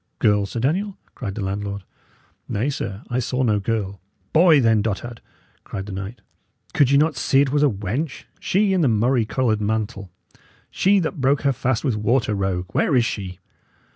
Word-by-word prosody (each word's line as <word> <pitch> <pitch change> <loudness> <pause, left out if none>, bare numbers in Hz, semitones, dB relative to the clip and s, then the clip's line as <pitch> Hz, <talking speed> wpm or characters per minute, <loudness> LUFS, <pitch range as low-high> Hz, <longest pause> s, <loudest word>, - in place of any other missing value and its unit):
"Girl, 105 -1 +2
Sir 115 - -5
Daniel?" 185 - -1 0.2
cried 100 -6 -5
the 110 - -3
landlord. 100 0 -4 0.7
"Nay, 125 +8 0
sir, 100 -6 -5
I 125 - +1
saw 130 +1 -1
no 105 -4 +2
girl." 100 -2 -3 0.3
"Boy, 160 -2 +6
then, 115 -4 +3
dotard!" 115 +3 -4 0.4
cried 95 - -6
the 105 - -7
knight. 100 +5 -6 0.5
"Could 140 -3 +4
ye 140 - +5
not 155 +1 +2
see 135 - +2
it 140 -2 +1
was 145 0 +2
a 150 - +5
wench? 110 - -3 0.2
She 195 +1 +1
in 185 - +2
the 150 - +3
murrey 120 +1 +2
coloured 110 -2 0
mantle 105 -1 -2 0.6
she 200 +2 +3
that 160 -2 -3
broke 135 +2 +2
her 140 -1 +3
fast 130 -2 -1
with 130 -7 0
water, 110 +1 +1
rogue 95 -2 -1
where 140 - +1
is 120 -2 +4
she?" 95 -6 -4
115 Hz, 185 wpm, -22 LUFS, 105-140 Hz, 0.7 s, Boy